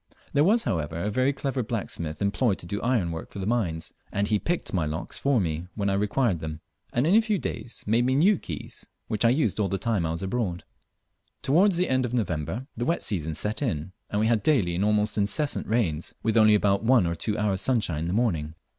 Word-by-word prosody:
There 145 - +4
was, 220 +7 +4
however, 80 -2 -2
a 100 +5 -2
very 130 +5 +2
clever 135 -1 -2
blacksmith 100 - -3
employed 100 +1 +1
to - - -11
do 100 +4 -3
ironwork 90 -10 -1
for - - -11
the 95 - -3
mines, 85 -9 -1 0.2
and 100 0 0
he 105 -1 +2
picked 175 - -2
my 90 -4 +1
locks 80 +2 -4
for 140 -3 +2
me 85 -2 -2
when 100 -2 0
I - - +1
required 105 -1 +1
them, 80 0 -5 0.3
and 125 - +1
in 170 - +3
a 225 - +7
few 220 -2 0
days 120 -6 -6
made 115 +3 +2
me 130 - +2
new 185 +6 +4
keys, - - -8 0.2
which 110 0 -1
I 115 - +6
used 120 - +1
all 105 - +2
the 95 - -1
time 105 -2 0
I - - -3
was 85 +3 -3
abroad. 95 -3 -2 0.8
Towards 170 +7 +4
the 180 0 +2
end 130 0 +2
of 125 0 -2
November 95 - -2
the 120 - -2
wet 170 - 0
season 80 -7 -1
set 105 - -2
in, 95 - -2 0.2
and 105 - -1
we 110 - +2
had 115 -1 +2
daily 105 - +2
and 90 +3 0
almost 105 0 +1
incessant 140 +9 0
rains, 95 -9 -1
with 110 0 +1
only 110 -2 +6
about 100 -1 +2
one 120 -4 +4
or 85 - 0
two 105 +5 -2
hours' 100 -2 0
sunshine 110 - +1
in 80 - -2
the 85 - -2
morning. 85 -9 0
105 Hz, 230 wpm, -26 LUFS, 90-125 Hz, 0.8 s, a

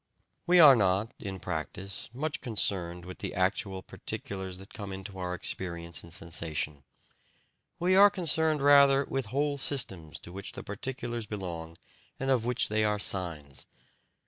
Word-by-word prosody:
We 180 0 +6
are 145 -5 +10
not, 100 +2 +2
in 95 -2 -6
practice, 90 +3 -5
much 145 +5 -3
concerned 90 -7 -1
with 90 - -9
the - - -5
actual 95 +1 0
particulars 95 -2 -6
that 95 +1 -13
come 100 -3 -6
into 95 0 -7
our 90 -1 -2
experience 85 -2 -3
in 85 - -12
sensation; 80 -3 -3 0.9
we 180 +2 +2
are 200 +1 +9
concerned 160 -5 +2
rather 140 -1 +6
with 135 -4 -3
whole 140 +4 0
systems 95 - -2
to 85 - -11
which 100 +1 -6
the - - -7
particulars 120 +1 -4
belong 85 -5 -5 0.4
and 135 0 0
of 120 -4 +2
which 125 0 +2
they 110 +1 +1
are 105 0 +2
signs. 85 -9 -1
100 Hz, 150 wpm, -30 LUFS, 90-135 Hz, 0.9 s, are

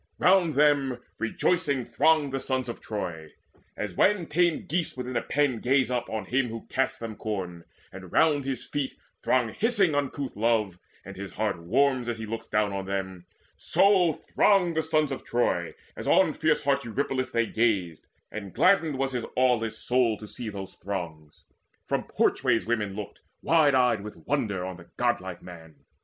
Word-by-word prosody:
Round 180 -5 +4
them 140 -3 +3 0.2
rejoicing 140 +2 0
thronged 150 -2 +2
the 135 - 0
sons 130 -1 -2
of 120 - -6
Troy: 80 -7 -5 0.4
As 105 -3 -4
when 190 - +3
tame 170 +1 +1
geese 165 -4 -2
within 125 0 -5
a - - +1
pen 140 -5 0
gaze 130 0 +2
up 125 -1 -2
On 110 -3 -3
him 125 +4 +1
who 115 0 -7
casts 135 0 0
them 115 -3 -6
corn, 90 -6 -5 0.3
and 95 -1 -10
round 150 -3 +3
his 130 -3 -4
feet 145 -2 -3 0.3
Throng 125 -3 +2
hissing 205 - +2
uncouth 140 -1 -2
love, 105 -4 +1 0.3
and - - -9
his 100 0 -7
heart 105 -5 -2
warms 125 +6 +1
As 120 - -2
he 110 - -5
looks 115 +1 -5
down 105 -1 0
on 95 -1 -3
them; 95 -2 -4 0.3
so 190 -4 +4
thronged 180 +2 +2
the 160 - +2
sons 155 -2 +1
Of 135 - -5
Troy, 90 -8 0 0.2
as - - -7
on - - +4
fierce - - +1
heart 140 0 +1
Eurypylus 130 +2 -2
They 115 0 +1
gazed; 100 -9 0 0.2
and 100 -3 -7
gladdened 165 -7 +3
was 135 0 -1
his 125 -3 -3
aweless 120 -4 +2
soul 120 -3 +1
To 105 - -10
see 115 +1 -6
those 95 -2 -7
throngs: 85 -6 -7 0.4
from - - -1
porchways 125 -4 +1
women 105 -4 -1
looked 105 -1 -7 0.2
Wide 155 -4 +4
eyed 125 -5 +3
with 100 -6 -10
wonder 105 -10 -1
on 95 -1 -6
the 85 -1 -15
godlike 95 -7 -1
man. 80 -3 -12
120 Hz, 175 wpm, -27 LUFS, 100-140 Hz, 0.4 s, Round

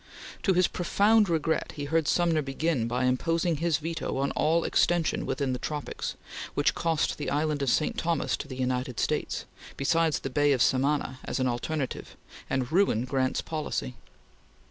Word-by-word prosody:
To 190 - +3
his 180 0 +4
profound 205 +3 +3
regret 160 -1 0
he 145 -2 -4
heard 160 +1 +1
Sumner 170 -3 +2
begin 135 -2 -1
by 125 +2 0
imposing 165 +6 +1
his 165 0 +1
veto 165 -2 -3
on 140 +1 0
all 165 +2 +2
extension 175 -2 +1
within 135 -3 -1
the 125 - -3
tropics; 150 -2 -4 0.4
which - - +2
cost 165 -2 0
the - - -2
island 150 0 0
of 135 - +1
St. 155 - +1
Thomas 165 -2 0
to - - -7
the 130 - -7
United 125 -1 -1
States, - - -1 0.3
besides 160 +3 +2
the 135 - -4
Bay 145 +1 +3
of 130 - 0
Samana 135 0 +1
as - - -2
an 130 - +2
alternative, 130 +3 -3 0.3
and 130 -2 -1
ruined 155 - +2
Grant's 130 -1 0
policy. 155 -4 -3
150 Hz, 165 wpm, -28 LUFS, 130-165 Hz, 0.4 s, his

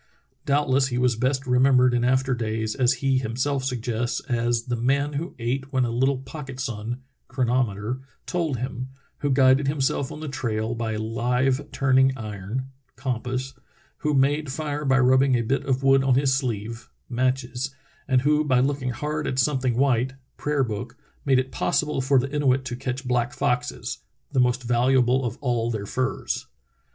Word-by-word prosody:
Doubtless 140 -2 +3
he 125 -2 -2
was 125 -1 +2
best 130 +3 0
remembered 125 0 +4
in 120 0 +1
after 130 +1 +2
days, 110 -2 -2
as 125 -2 +3
he 135 -1 +3
himself 130 +3 -1
suggests, 120 -2 -2
"As 120 -2 0
the 120 0 -2
man 140 +5 +1
who 160 +5 -4
ate 130 +3 -2
when 130 -2 +2
a 120 - -2
little 130 +3 +2
pocket 135 0 -8
sun 120 0 -4 0.2
[chronometer] 120 -2 0 0.3
told 165 -7 -1
him; 125 +1 -4 0.3
who 145 - -1
guided 135 +1 +4
himself 140 -1 0
on - - -7
the 155 - -5
trail 115 -4 -2
by 115 -1 -2
a 105 - -3
hve 125 +5 0
turning 130 0 +3
iron 110 +3 -5 0.3
[compass]; 130 +1 -3 0.5
who 150 -1 0
made 145 +2 +2
fire 150 +1 -3
by 135 -1 +4
rubbing 130 +1 +4
a 120 - +1
bit 135 +5 0
of 130 0 0
wood 135 0 +5
on 135 -2 +3
his 135 0 +3
sleeve 115 -4 -3 0.2
[matches]; 130 +1 -1 0.3
and 130 -2 +3
who 150 +1 +3
by 130 -4 +3
looking 135 0 0
hard 150 +5 -3
at 130 - -2
something 130 -3 +1
white 130 -1 +2 0.2
[prayer 145 -2 0
book] 105 -4 -5 0.3
made 135 -2 +4
it 130 0 -1
possible 150 -1 0
for 135 +1 +3
the 135 +3 0
Inuit 135 -2 +2
to 125 - -3
catch 130 +1 -4
black 120 -1 +1
foxes 125 0 -2 0.2
— - - -47
the 130 - +2
most 125 0 +2
valuable 125 +1 +3
of 120 -2 -3
all 120 -4 0
their 110 -3 -3
furs.' 130 +5 -2
130 Hz, 175 wpm, -25 LUFS, 120-135 Hz, 0.5 s, wood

